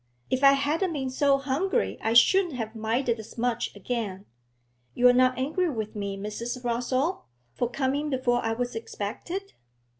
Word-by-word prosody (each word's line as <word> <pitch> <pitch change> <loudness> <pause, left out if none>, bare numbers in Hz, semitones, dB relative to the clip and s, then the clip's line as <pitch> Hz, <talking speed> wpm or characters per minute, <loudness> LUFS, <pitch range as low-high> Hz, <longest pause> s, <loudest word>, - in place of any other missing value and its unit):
If 260 +1 0
I 275 0 +8
hadn't 310 +6 0
been 265 -3 -3
so 275 +1 +3
hungry 300 - -1
I 225 - 0
shouldn't 345 +6 +5
have 225 -2 -4
minded 230 +2 0
as 220 - -11
much 240 -1 -1
again. 205 -2 -4 0.7
You're 250 0 +6
not 255 0 +3
angry 315 +7 0
with 220 -6 -4
me, 200 -1 -3
Mrs. 235 +5 -5
Rossall, 255 +8 -1 0.3
for 245 - -1
coming 280 +3 -1
before 250 -3 +1
I 225 0 0
was 245 +1 -3
expected?' 245 - -5
250 Hz, 155 wpm, -27 LUFS, 230-280 Hz, 0.7 s, I